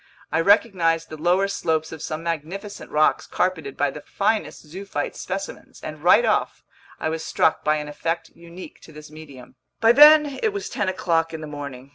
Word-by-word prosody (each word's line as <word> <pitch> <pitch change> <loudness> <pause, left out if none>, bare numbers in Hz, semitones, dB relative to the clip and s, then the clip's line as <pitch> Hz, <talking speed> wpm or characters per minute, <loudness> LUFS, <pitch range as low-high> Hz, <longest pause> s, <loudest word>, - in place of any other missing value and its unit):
I 160 +2 +2
recognized 165 -4 +2
the 155 - -7
lower 180 +4 +2
slopes 160 -5 -1
of 160 - -8
some 155 +1 -5
magnificent 170 +6 -5
rocks 155 +1 +2
carpeted 160 -7 -2
by 145 -1 +1
the 150 - -9
finest 200 -4 -2
zoophyte 180 -1 -5
specimens, 195 +1 -7
and 155 0 -8
right 205 +7 +5
off, 215 - 0 0.4
I - - -2
was 160 0 -4
struck 160 - +1
by 155 0 +2
an 150 -1 -4
effect 165 +3 -3
unique 170 +2 -13
to - - -15
this 150 0 -12
medium. 145 -5 -13 0.2
By 225 0 +5
then 295 +1 +7
it 440 -3 0
was 400 - -5
ten 205 -3 -1
o'clock 165 -3 0
in 160 - -7
the - - -6
morning. 140 -3 -8
165 Hz, 185 wpm, -23 LUFS, 155-195 Hz, 0.4 s, then